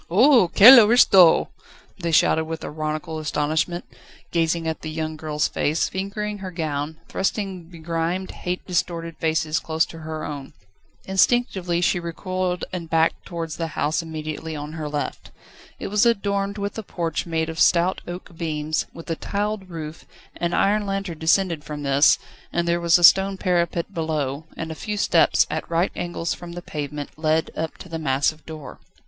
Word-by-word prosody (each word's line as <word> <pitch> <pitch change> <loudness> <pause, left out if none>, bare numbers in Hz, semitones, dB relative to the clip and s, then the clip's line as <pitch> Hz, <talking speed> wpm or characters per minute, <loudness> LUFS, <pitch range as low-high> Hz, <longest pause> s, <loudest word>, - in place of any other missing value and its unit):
"Oho, 235 - +6
quelle 230 +9 +10
aristo!" 210 -6 +6 0.5
they 170 -2 -2
shouted 160 0 +3
with 160 0 -6
ironical 155 +1 -4
astonishment, 155 +3 -1 0.5
gazing 165 0 0
at 160 - -3
the 155 - -5
young 155 0 -3
girl's 150 -1 -1
face, 155 +2 0
fingering 205 +2 -4
her 190 -1 -6
gown, 155 -3 -3
thrusting 190 -3 -2
begrimed, 170 +2 -3
hate 180 0 -4
distorted 170 -2 -2
faces 160 -1 0
close 160 0 0
to 165 - -11
her 155 -1 -5
own. 140 -2 -7 0.5
Instinctively 190 -3 +1
she 180 +1 +2
recoiled 180 +1 -3
and 170 -3 -5
backed 165 0 +1
towards 165 -3 -5
the 165 - -2
house 150 +4 +1
immediately 160 0 -6
on 150 +1 -6
her 155 -2 -5
left. 145 0 -4 0.5
It - - -5
was 210 +1 +3
adorned 200 -3 +1
with 200 +2 -4
a - - -3
porch 170 -5 -3
made 160 -1 -1
of 165 0 -6
stout 175 +3 +3
oak 175 0 -8
beams, 155 -1 -2
with 165 - -10
a - - 0
tiled 205 +1 -3
roof; 160 -2 -7 0.3
an 170 0 -1
iron 205 +1 +2
lantern 195 -5 -3
descended 165 -1 +2
from 150 -1 -6
this, 140 +1 +5 0.3
and 170 0 -1
there 170 0 +1
was 170 0 +5
a 175 - -2
stone 195 +3 +6
parapet 175 -1 0
below, 155 -3 -2
and 160 0 -4
a - - -3
few 210 +6 -5
steps, - - +4
at - - -4
right 170 +3 +1
angles 175 -1 -3
from 175 -1 -9
the 175 0 -7
pavement, 145 -2 -5
led 155 0 +1
up 160 0 -4
to - - -11
the 165 -2 -5
massive 145 +1 0
door. 155 -3 -9
165 Hz, 170 wpm, -23 LUFS, 155-185 Hz, 0.5 s, quelle